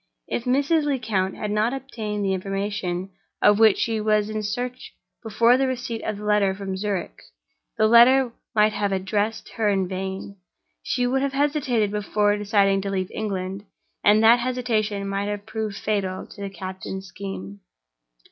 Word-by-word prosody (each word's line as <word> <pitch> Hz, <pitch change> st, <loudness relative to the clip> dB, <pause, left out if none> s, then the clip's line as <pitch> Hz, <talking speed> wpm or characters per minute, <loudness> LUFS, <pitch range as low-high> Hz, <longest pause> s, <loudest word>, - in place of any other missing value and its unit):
If 235 Hz, -, -3 dB
Mrs. 285 Hz, +5 st, +2 dB
Lecount 220 Hz, -9 st, -1 dB
had 210 Hz, -, -4 dB
not 215 Hz, +5 st, +1 dB
obtained 215 Hz, -6 st, -4 dB
the 190 Hz, -, +1 dB
information 195 Hz, -1 st, -3 dB, 0.3 s
of 205 Hz, 0 st, +5 dB
which 220 Hz, -3 st, +6 dB
she 225 Hz, -2 st, 0 dB
was 215 Hz, 0 st, +1 dB
in 215 Hz, 0 st, -2 dB
search 245 Hz, +4 st, -4 dB, 0.3 s
before 230 Hz, +2 st, +3 dB
the 270 Hz, 0 st, +1 dB
receipt 245 Hz, -3 st, -3 dB
of 215 Hz, -2 st, -3 dB
the 210 Hz, -, -8 dB
letter 205 Hz, -2 st, +2 dB
from 195 Hz, -1 st, -4 dB
Zurich, 190 Hz, -, -3 dB, 0.6 s
the 215 Hz, -, +4 dB
letter 240 Hz, +3 st, +6 dB, 0.2 s
might 215 Hz, 0 st, +4 dB
have 205 Hz, -1 st, -1 dB
addressed 205 Hz, +3 st, -1 dB
her 220 Hz, -2 st, 0 dB
in 195 Hz, -2 st, +1 dB
vain. 190 Hz, +1 st, -5 dB, 0.4 s
She 245 Hz, -, -1 dB
would 265 Hz, +2 st, +1 dB
have 275 Hz, 0 st, -1 dB
hesitated 270 Hz, -7 st, +1 dB
before 210 Hz, 0 st, +1 dB
deciding 200 Hz, -1 st, +2 dB
to 200 Hz, -, -3 dB
leave 185 Hz, -2 st, -2 dB
England, 195 Hz, -2 st, -4 dB, 0.4 s
and 210 Hz, +1 st, +5 dB
that 230 Hz, +2 st, +7 dB
hesitation 225 Hz, -5 st, -1 dB
might 195 Hz, +1 st, -2 dB
have 205 Hz, 0 st, -4 dB
proved 215 Hz, -2 st, -4 dB
fatal 190 Hz, -3 st, -2 dB
to 200 Hz, -, -13 dB
the 200 Hz, -, -3 dB
captain's 190 Hz, +1 st, -7 dB
scheme. 175 Hz, -, -7 dB
210 Hz, 165 wpm, -24 LUFS, 195-230 Hz, 0.6 s, that